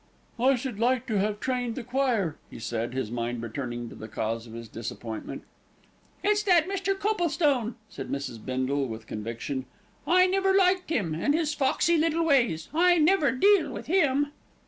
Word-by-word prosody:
"I 265 +3 +4
should 255 +1 -4
have 205 - -11
liked 250 +2 +2
to 210 -3 +1
have 210 +1 -1
trained 245 -2 -2
the 260 - -5
choir," 245 - 0
he - - -10
said, 115 +2 -3
his 130 -5 -2
mind 120 0 -3
returning 120 0 -4
to - - -11
the 110 - -9
cause 115 +1 -3
of 110 - -11
his 115 0 -7
disappointment. 115 0 -6 0.8
"It's 415 0 +3
that 355 -5 +4
Mr. 390 0 -1
Coplestone," 315 - +1
said 135 -10 -8
Mrs. 140 -5 -4
Bindle 130 +2 -1
with 110 -1 -7
conviction. 115 +5 -5 0.4
"I 365 +1 +6
never 385 +1 +2
liked 370 -2 +3
him, 205 - 0
with 290 - +2
his 315 -2 0
foxy 295 +4 +2
little 330 +1 +1
ways. 235 - +2
I 350 +2 +5
never 315 -2 +4
deal 395 +7 +4
with - - -7
him." 290 -5 +2
250 Hz, 175 wpm, -27 LUFS, -, 0.8 s, I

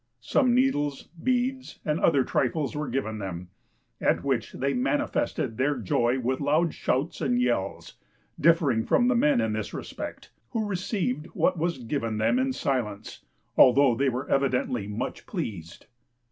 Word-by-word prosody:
Some 250 - +2
needles, 145 - 0
beads, 255 +1 -1
and 155 +1 0
other 140 -5 +4
trifles 140 +5 -1
were 150 0 -2
given 110 -5 -2
them, 90 -3 -6 0.5
at - - +2
which - - -1
they 140 +1 -1
manifested 285 - -1
their 140 +2 +1
joy 120 +3 +1
with 130 +1 -1
loud 155 +4 +2
shouts 135 +6 -1
and 125 -5 +1
yells, 120 -6 -1 0.4
differing 150 -8 +3
from 245 - +3
the 255 - +3
men 150 - +3
in 110 -1 0
this 110 -1 -4
respect, - - -7 0.2
who 220 -2 0
received 180 - -2
what 185 -2 +2
was 170 0 0
given 115 -3 -3
them 110 - +2
in 260 0 +1
silence, 115 - -3 0.3
although 130 0 +6
they 135 +4 +1
were 125 +1 -4
evidently 125 -5 0
much 105 +4 -5
pleased. 100 - -6
135 Hz, 150 wpm, -27 LUFS, 120-170 Hz, 0.5 s, although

